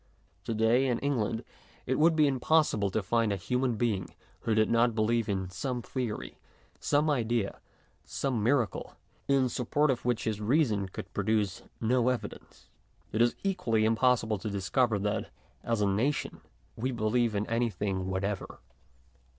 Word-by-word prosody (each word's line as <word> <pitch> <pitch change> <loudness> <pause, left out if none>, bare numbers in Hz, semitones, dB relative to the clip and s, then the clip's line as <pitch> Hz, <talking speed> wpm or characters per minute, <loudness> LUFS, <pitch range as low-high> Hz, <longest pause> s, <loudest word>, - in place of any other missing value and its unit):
To 115 - -2
day, 115 +5 +3
in 120 -2 +1
England, 115 -5 -1 0.4
it 130 +2 0
would 165 +1 +5
be 155 -1 +5
impossible 135 -6 +2
to 105 +2 -1
find 115 +2 +1
a - - +1
human 125 +6 -1
being 105 -5 -1 0.2
who 110 - 0
did 110 0 +4
not 115 0 +3
believe 115 0 +1 0.2
some 125 +6 -3
theory, 110 - -4 0.4
some 145 +2 +2
idea, 120 -7 0 0.4
some 130 -5 -2
miracle, 120 -2 0 0.3
in 135 -2 +3
support 135 +5 +1
of 125 - -3
which 120 -2 0
his 105 -1 -2
reason 110 -5 +1
could - - -8
produce 105 -4 0 0.2
no 125 +2 +2
evidence. 125 -2 -6 0.4
It 110 - 0
is 120 0 +3
equally 180 - +1
impos 115 +2 +3
sible 110 -3 -2
to 110 - -3
discover 105 +4 +1
that, 105 +2 -2 0.3
as 115 -2 0
a 100 - +3
nation, 115 +10 -1 0.3
we 130 +4 -2
believe 115 -1 +1
in 100 +1 0
anything 105 -5 -1
whatever. 95 +1 -3
115 Hz, 150 wpm, -29 LUFS, 105-125 Hz, 0.4 s, would